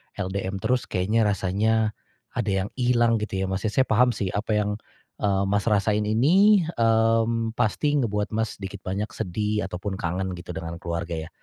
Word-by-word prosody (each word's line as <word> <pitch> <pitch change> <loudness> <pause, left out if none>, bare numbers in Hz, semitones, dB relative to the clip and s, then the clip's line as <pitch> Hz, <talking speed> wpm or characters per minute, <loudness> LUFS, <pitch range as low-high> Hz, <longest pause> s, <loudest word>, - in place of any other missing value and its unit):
LDM 95 0 -3
terus 125 0 +1
kayaknya 105 +4 +1
rasanya, 105 +3 +1 0.4
ada 120 -2 -3 0.2
yang 105 - -6
hilang 120 -2 +3
gitu 95 -3 -2
ya - - 0
Mas 95 +3 -1
ya - - -2
saya 130 - +5
paham 125 -1 +3
sih 95 -5 -2
apa 105 +2 -2
yang, 105 0 0 0.4
eee, 100 -1 +1
Mas 100 0 +1
rasain 105 0 +2
ini, 180 - +5 0.2
mmm, 115 0 +2
pasti 145 +7 +1
ngebuat 105 -3 -1
Mas 110 -1 -1
sedikit 100 0 -7
banyak 100 +3 -2
sedih 105 +3 -2
ataupun 95 +2 -4
kangen 90 +2 -2
gitu 85 +1 -8
dengan 85 +1 -5
keluarga 85 -1 -3
ya, - - -15
105 Hz, 175 wpm, -25 LUFS, 95-115 Hz, 0.4 s, saya